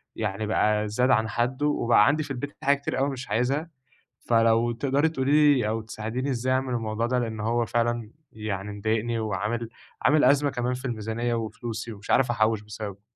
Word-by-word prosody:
يعني 105 -1 -2
بقى 105 0 +2
زاد 125 +5 +1
عن 110 -1 +3
حدُّه 125 +6 0
وبقى 120 -7 +4
عندي 155 +2 +2
في 145 - -8
البيت 140 +2 -5
حاجات 140 0 +3
كتير 130 - -2
أوي 135 +1 +2
مش 130 -2 -6
عايزها، 135 +8 0 0.6
فلو 115 0 +4
تقدَري 140 +5 +1
تقولي 145 0 +4
لي 125 -5 0
أو 110 +1 -1
تساعديني 110 +4 -4
إزاي 130 +1 0
اعمل 130 -1 0
الموضوع 115 -1 -1
ده؟ 125 +1 +1
لإن 110 -2 -3
هو 115 +2 0
فعلًا 120 -1 -1 0.2
يعني 105 -2 -4
مضايقني 110 +3 -1
وعامل 110 +2 -2 0.3
عامل 150 +2 +4
أزمَة 145 0 +4
كمان 125 -1 -2
في 125 +2 -6
الميزانيّة 115 0 -2
وفلوسي 115 0 -5
ومش 100 0 -7
عارف 125 -2 +4
أحوِّش 110 -2 +1
بسببه. 105 -1 -7
120 Hz, 180 wpm, -26 LUFS, 110-130 Hz, 0.6 s, وبقى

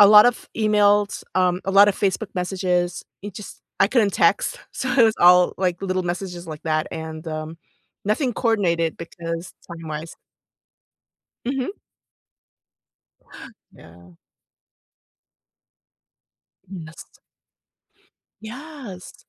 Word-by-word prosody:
a 205 - +10
lot 210 0 +9
of 245 -1 +1
emails, 205 -2 +3
um, 180 0 +2
a 195 - +1
lotta 200 +1 +7
Facebook 195 +1 -2
messages, 180 -1 -1 0.2
it 205 -1 -8
just 210 - -10 0.2
I 195 - +7
couldn't 215 -4 +2
text, - - +2
so 260 - -3
it 240 -3 +6
was 220 0 +3
all, 180 0 +7
like, 185 0 -1
little 185 -1 -1
messages 175 0 -4
like 155 -2 -8
that 155 -1 0
and, 160 0 -7
um, 155 +1 -5 0.5
nothing 245 +4 +1
coordinated 175 -9 +1
because 165 0 -6 0.2
timewise 160 -1 -6 1.3
Mhm. 270 - -2 2.0
Yeah. 85 +1 -17 2.5
Goodness. 170 -4 -10 1.4
Yes. 245 - -9
185 Hz, 105 wpm, -23 LUFS, 165-210 Hz, 2.5 s, a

